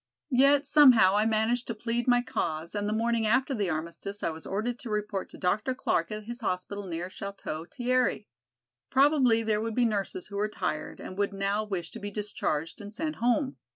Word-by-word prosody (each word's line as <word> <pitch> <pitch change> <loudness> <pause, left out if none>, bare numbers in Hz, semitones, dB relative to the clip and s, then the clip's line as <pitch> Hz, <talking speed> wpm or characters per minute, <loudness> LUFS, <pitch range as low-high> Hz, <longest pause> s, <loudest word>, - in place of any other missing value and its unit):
Yet 275 +3 +5
somehow 255 -10 +7
I 210 +1 +3
managed 225 +3 +1
to 230 - -3
plead 235 +2 -2
my 245 -1 +4
cause 160 -7 -3
and 205 0 -1
the - - -1
morning 225 0 +1
after 260 +5 +2
the 205 -6 -1
armistice 170 +5 -4
I - - +1
was 160 0 -9
ordered 230 +5 -2
to 240 - -7
report 210 -2 -2
to - - -12
Dr. 210 +7 0
Clark 170 -8 0
at 215 0 -5
his 240 +3 -6
hospital 200 0 -3
near 170 0 -4
Château 190 -5 -6
Thierry. 255 0 0 0.6
Probably 265 -5 +4
there 215 -1 +1
would 225 -1 -3
be 245 - +3
nurses 200 -4 -2
who 200 - -7
were 210 +1 0
tired 180 -6 -4
and 185 - -8
would 200 0 0
now 200 +2 0
wish 185 -6 -4
to - - -8
be 205 - -5
discharged 200 -6 -3
and 205 0 -8
sent 310 +6 -3
home. 245 +4 +1
215 Hz, 200 wpm, -28 LUFS, 195-245 Hz, 0.6 s, somehow